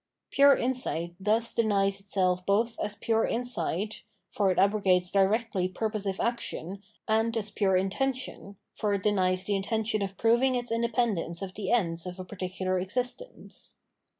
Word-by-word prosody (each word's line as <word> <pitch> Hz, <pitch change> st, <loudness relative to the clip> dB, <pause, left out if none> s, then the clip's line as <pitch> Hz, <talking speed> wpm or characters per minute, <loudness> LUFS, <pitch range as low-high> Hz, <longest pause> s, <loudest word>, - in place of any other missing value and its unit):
Pure 280 Hz, 0 st, +6 dB
insight 240 Hz, -10 st, -1 dB
thus 220 Hz, +4 st, +1 dB
denies 200 Hz, -3 st, +1 dB
itself 185 Hz, -2 st, 0 dB
both 220 Hz, +5 st, +1 dB
as 210 Hz, 0 st, -3 dB
pure 225 Hz, +1 st, +1 dB
insight, 215 Hz, -3 st, -2 dB, 0.2 s
— -, -, -49 dB
for 200 Hz, -2 st, +2 dB
it 185 Hz, -, 0 dB
abrogates 190 Hz, -3 st, +3 dB
directly 200 Hz, -1 st, +2 dB
purposive 200 Hz, 0 st, -3 dB
action, 200 Hz, -5 st, -3 dB, 0.3 s
and 225 Hz, +1 st, +1 dB
as 210 Hz, -2 st, -3 dB
pure 195 Hz, -2 st, +2 dB
intention, 205 Hz, +1 st, -2 dB
— -, -, -54 dB
for 205 Hz, -1 st, +1 dB
it 195 Hz, -, -4 dB
denies 185 Hz, -3 st, +2 dB
the 205 Hz, +1 st, 0 dB
intention 215 Hz, +2 st, -1 dB
of 195 Hz, -1 st, -4 dB
proving 240 Hz, +3 st, +3 dB
its 245 Hz, -1 st, -3 dB
independence 230 Hz, -7 st, 0 dB
of 185 Hz, -1 st, -6 dB
the 195 Hz, -2 st, -4 dB
ends 170 Hz, -7 st, 0 dB
of 180 Hz, -, -6 dB
particular 185 Hz, -1 st, -2 dB
existence. 250 Hz, -, -5 dB
205 Hz, 150 wpm, -28 LUFS, 185-230 Hz, 0.3 s, Pure